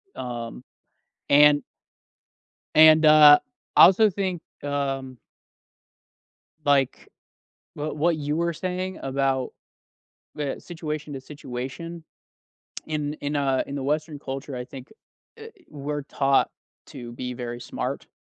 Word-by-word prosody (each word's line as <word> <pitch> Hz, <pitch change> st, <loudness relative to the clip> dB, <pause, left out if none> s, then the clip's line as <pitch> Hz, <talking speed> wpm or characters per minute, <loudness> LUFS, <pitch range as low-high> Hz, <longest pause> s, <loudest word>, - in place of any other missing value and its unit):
Um. 120 Hz, -1 st, -6 dB, 0.7 s
And 145 Hz, 0 st, +6 dB, 1.1 s
and, 155 Hz, 0 st, +7 dB
uh, 150 Hz, -1 st, +9 dB, 0.4 s
I -, -, +9 dB
also 210 Hz, +4 st, +5 dB
think, 185 Hz, -3 st, -3 dB, 0.2 s
um 135 Hz, -2 st, -3 dB, 1.5 s
like, 140 Hz, -2 st, +1 dB, 0.7 s
wh 150 Hz, +1 st, -4 dB
what 165 Hz, +2 st, +1 dB
you 150 Hz, 0 st, -2 dB
were 170 Hz, +1 st, 0 dB
saying 185 Hz, +2 st, -4 dB
about 135 Hz, -1 st, -1 dB, 0.8 s
the 145 Hz, -3 st, -3 dB
situation 155 Hz, -3 st, -6 dB
to 135 Hz, -, -6 dB
situation. 145 Hz, +5 st, -7 dB, 0.8 s
In 150 Hz, -1 st, -3 dB
in 145 Hz, -1 st, -4 dB
a 135 Hz, -2 st, +1 dB
in 140 Hz, -, -7 dB
the 140 Hz, -, -3 dB
Western 150 Hz, +2 st, -2 dB
culture, 135 Hz, 0 st, -6 dB
I 125 Hz, -, -5 dB
think, 130 Hz, +5 st, -12 dB, 0.5 s
uh, -, -, -9 dB, 0.2 s
we're 145 Hz, 0 st, -5 dB
taught 135 Hz, -1 st, +1 dB, 0.4 s
to 120 Hz, -1 st, -9 dB
be 125 Hz, +1 st, -5 dB
very 120 Hz, -1 st, -6 dB
smart. 120 Hz, -, -5 dB
145 Hz, 115 wpm, -24 LUFS, 135-155 Hz, 1.5 s, uh